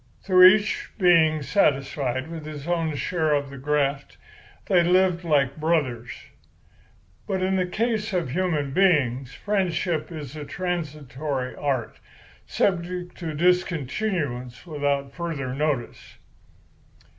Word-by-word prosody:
Through 185 Hz, -1 st, +8 dB
each 205 Hz, +2 st, +2 dB
being 165 Hz, -5 st, +4 dB
satisfied 135 Hz, -3 st, 0 dB
with 165 Hz, -1 st, -7 dB
his 150 Hz, 0 st, -8 dB
own 165 Hz, -3 st, 0 dB
share 155 Hz, 0 st, 0 dB
of 140 Hz, -1 st, -2 dB
the 135 Hz, -, -9 dB
graft, 140 Hz, 0 st, -1 dB, 0.5 s
they 180 Hz, -2 st, +4 dB
lived 180 Hz, 0 st, +3 dB
like 140 Hz, -4 st, +1 dB
brothers. 140 Hz, -7 st, 0 dB, 1.2 s
"But 190 Hz, -2 st, -1 dB
in 190 Hz, +1 st, +1 dB
the 185 Hz, -1 st, +1 dB
case 220 Hz, +3 st, -1 dB
of 175 Hz, -8 st, -1 dB
human 160 Hz, -4 st, -1 dB
beings, 135 Hz, -8 st, +2 dB
friendship 180 Hz, -5 st, -1 dB
is 150 Hz, -4 st, -7 dB
a 150 Hz, -, -6 dB
transitory 150 Hz, -6 st, -4 dB
art, 135 Hz, -6 st, -2 dB, 0.5 s
subject 180 Hz, -1 st, -1 dB
to 160 Hz, -4 st, -4 dB
discontinuance 165 Hz, -, -1 dB
without 140 Hz, -3 st, -2 dB
further 155 Hz, -7 st, -4 dB
notice. 140 Hz, -4 st, -3 dB
155 Hz, 115 wpm, -24 LUFS, 140-180 Hz, 1.2 s, Through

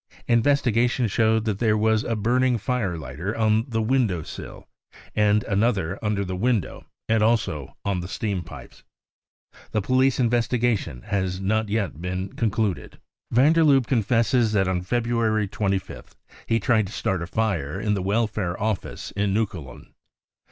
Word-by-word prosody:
Investigation 120 Hz, -1 st, +2 dB
showed 110 Hz, +1 st, +2 dB
that 105 Hz, -3 st, -1 dB
there 110 Hz, -2 st, +2 dB
was 110 Hz, 0 st, +2 dB
a 115 Hz, -, -1 dB
burning 120 Hz, +3 st, +2 dB
fire 105 Hz, -6 st, -1 dB
lighter 85 Hz, +7 st, -5 dB
on 110 Hz, 0 st, +2 dB
the 115 Hz, -2 st, 0 dB
window 110 Hz, -9 st, +1 dB
sill, -, -, -9 dB, 0.5 s
and 105 Hz, 0 st, +3 dB
another 100 Hz, -4 st, 0 dB
under 105 Hz, -2 st, 0 dB
the 95 Hz, 0 st, -4 dB
window 115 Hz, +2 st, -1 dB, 0.2 s
and 110 Hz, -1 st, +2 dB
also 80 Hz, -, 0 dB
on 100 Hz, -2 st, 0 dB
the 90 Hz, -, -5 dB
steam 100 Hz, -1 st, -2 dB
pipes. 85 Hz, -, -12 dB, 0.9 s
The 110 Hz, -, +1 dB
police 130 Hz, +3 st, +2 dB
investi 120 Hz, 0 st, +1 dB
gation 100 Hz, -, -1 dB
has 95 Hz, -3 st, -2 dB
not 110 Hz, +2 st, 0 dB
yet 100 Hz, -7 st, -2 dB
been 90 Hz, +1 st, -3 dB
concluded. 110 Hz, -4 st, -1 dB, 0.3 s
55 -, -, -11 dB
Van 140 Hz, +6 st, +5 dB
der 165 Hz, -, +3 dB
Lubbe 135 Hz, -5 st, +4 dB
confesses 115 Hz, -1 st, +2 dB
that 95 Hz, -3 st, +2 dB
on 90 Hz, -1 st, 0 dB
February 115 Hz, +1 st, 0 dB
25th 100 Hz, -1 st, -3 dB, 0.3 s
he 115 Hz, -, +2 dB
tried 110 Hz, -1 st, +2 dB
to 100 Hz, -, -10 dB
start 95 Hz, -3 st, -1 dB
a 85 Hz, -, -4 dB
fire 95 Hz, -6 st, -1 dB
in 105 Hz, 0 st, 0 dB
the 100 Hz, -, -1 dB
Welfare 105 Hz, -2 st, -1 dB
Office 105 Hz, -3 st, -3 dB
in 100 Hz, 0 st, 0 dB
Neukolln. 85 Hz, -, -4 dB
110 Hz, 160 wpm, -24 LUFS, 95-115 Hz, 0.9 s, Van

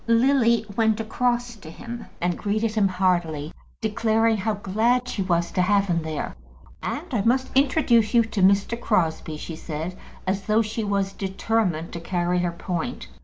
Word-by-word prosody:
Lily 235 Hz, -1 st, +4 dB
went 220 Hz, -1 st, +2 dB
across 240 Hz, +1 st, -1 dB
to 165 Hz, -6 st, -11 dB
him 235 Hz, +7 st, -8 dB
and 175 Hz, 0 st, 0 dB
greeted 215 Hz, +3 st, -1 dB
him 210 Hz, -3 st, +3 dB
heartily, 175 Hz, -5 st, 0 dB, 0.3 s
declaring 220 Hz, +1 st, +2 dB
how 210 Hz, +2 st, -1 dB
glad 225 Hz, +6 st, +1 dB
she 210 Hz, -, -3 dB
was 170 Hz, -2 st, 0 dB
to 180 Hz, -, +1 dB
have 200 Hz, +2 st, +3 dB
him 170 Hz, -3 st, 0 dB
there. 155 Hz, -1 st, -4 dB, 0.5 s
"And -, -, -3 dB
I -, -, +2 dB
must 260 Hz, +5 st, +1 dB
introduce 255 Hz, -5 st, +3 dB
you 235 Hz, -, +6 dB
to 220 Hz, -3 st, -3 dB
Mr. 200 Hz, +5 st, +3 dB
Crosbie," 160 Hz, -7 st, 0 dB
she 160 Hz, +2 st, -6 dB
said, 160 Hz, +2 st, -5 dB, 0.3 s
as 190 Hz, +1 st, 0 dB
though 220 Hz, +1 st, +3 dB
she 220 Hz, +1 st, -3 dB
was 200 Hz, -1 st, 0 dB
determined 190 Hz, -4 st, -1 dB
to 170 Hz, -, -4 dB
carry 175 Hz, +1 st, 0 dB
her 175 Hz, -1 st, 0 dB
point. 180 Hz, +7 st, -4 dB
205 Hz, 170 wpm, -24 LUFS, 180-230 Hz, 0.5 s, you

